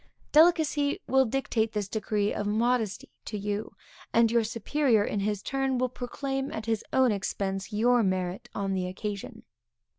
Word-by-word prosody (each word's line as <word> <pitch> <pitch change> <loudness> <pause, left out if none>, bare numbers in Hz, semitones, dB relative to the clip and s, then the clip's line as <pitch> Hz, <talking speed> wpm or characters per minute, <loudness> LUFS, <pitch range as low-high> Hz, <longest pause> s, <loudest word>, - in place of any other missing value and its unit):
Delicacy 310 -3 +4
will 265 0 +4
dictate 225 -3 -1
this 210 -2 -2
degree 210 -1 -1
of 205 - -2
modesty 225 0 0 0.2
to 210 - -4
you, 205 0 -3 0.4
and 230 -1 +4
your 235 -1 +3
superior 230 +1 +1
in 205 - -2
his 205 0 -1
turn 270 -1 0
will 255 0 +1
proclaim 270 +2 -4
at 220 - -5
his 225 -2 -1
own 260 -2 +4
expense, 195 0 -3
your 240 +3 +3
merit 185 -2 -1
on 195 -1 -1
the 185 -1 -1
occasion. 200 +2 -6
220 Hz, 155 wpm, -28 LUFS, 205-255 Hz, 0.4 s, Delicacy